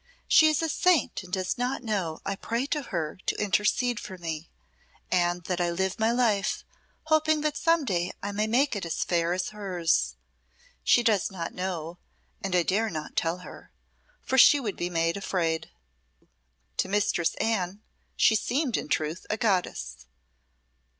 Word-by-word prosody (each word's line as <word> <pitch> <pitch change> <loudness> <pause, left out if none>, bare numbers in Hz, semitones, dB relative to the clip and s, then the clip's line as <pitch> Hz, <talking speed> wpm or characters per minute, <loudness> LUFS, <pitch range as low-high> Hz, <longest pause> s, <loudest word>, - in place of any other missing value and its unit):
"She 315 - +7
is 310 +1 +2
a - - +1
saint 330 - +2
and 180 -2 -13
does 185 +4 -1
not 250 +1 -1
know 190 -8 -2
I 200 - -1
pray 230 +5 -2
to 295 +1 -1
her 170 - -4
to - - 0
intercede 210 +4 +1
for 190 -2 -8
me, 165 -2 -5 0.6
and 175 -1 +1
that 180 +1 -2
I 175 - +1
live 190 +3 -1
my 220 +1 +3
life 225 -5 +1 0.4
hoping 315 0 +2
that 300 -1 0
some 330 -1 +2
day 180 -5 0
I 200 - -2
may 210 +2 0
make 255 +4 +2
it 205 - -3
as 170 -1 -1
fair 170 -1 +1
as 180 +1 -1
hers. 175 - 0 0.7
She 240 - +4
does 215 -5 +2
not 170 -4 -5
know, 175 -2 -4 0.4
and 195 -2 -1
I 175 - +4
dare 215 +6 +1
not 155 -4 -6
tell 170 +2 0
her, - - -12 0.5
for 265 - +2
she 290 - +8
would 220 -7 -3
be 175 - -3
made 165 +1 0
afraid." 170 -5 -1 1.1
To - - +1
Mistress 195 -4 +1
Anne 205 -2 -1 0.3
she - - +5
seemed 255 +4 0
in - - -4
truth 155 +3 -2
a 215 - 0
goddess. 195 -5 -1
195 Hz, 170 wpm, -27 LUFS, 175-235 Hz, 1.1 s, she